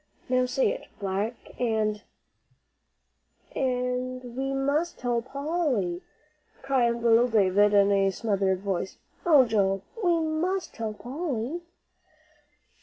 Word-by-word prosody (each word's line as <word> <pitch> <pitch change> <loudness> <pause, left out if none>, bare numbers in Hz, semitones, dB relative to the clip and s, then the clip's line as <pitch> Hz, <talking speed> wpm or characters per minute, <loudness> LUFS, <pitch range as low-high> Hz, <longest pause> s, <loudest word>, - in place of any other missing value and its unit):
Now 255 0 +2
say 260 +1 +2
it, - - -6
'black 200 +4 -2 0.3
and 215 -3 0 0.7
"' - - -35
"And 250 -1 -2
we 270 +1 -2
must 285 +5 0
tell 240 -1 0
Polly," 265 - -1 0.6
cried 240 -4 +1
little 235 +1 +5
Davie, 205 -3 +4
in 200 0 +5
a 195 -1 +3
smothered 195 -2 0
voice. 190 -1 -3 0.3
"Oh, 295 -6 +7
Joel, 195 -4 +1 0.2
we 345 -2 +3
must 330 +3 -1
tell 220 -1 -4
Polly." 275 +3 -4
245 Hz, 110 wpm, -27 LUFS, 205-270 Hz, 0.7 s, Oh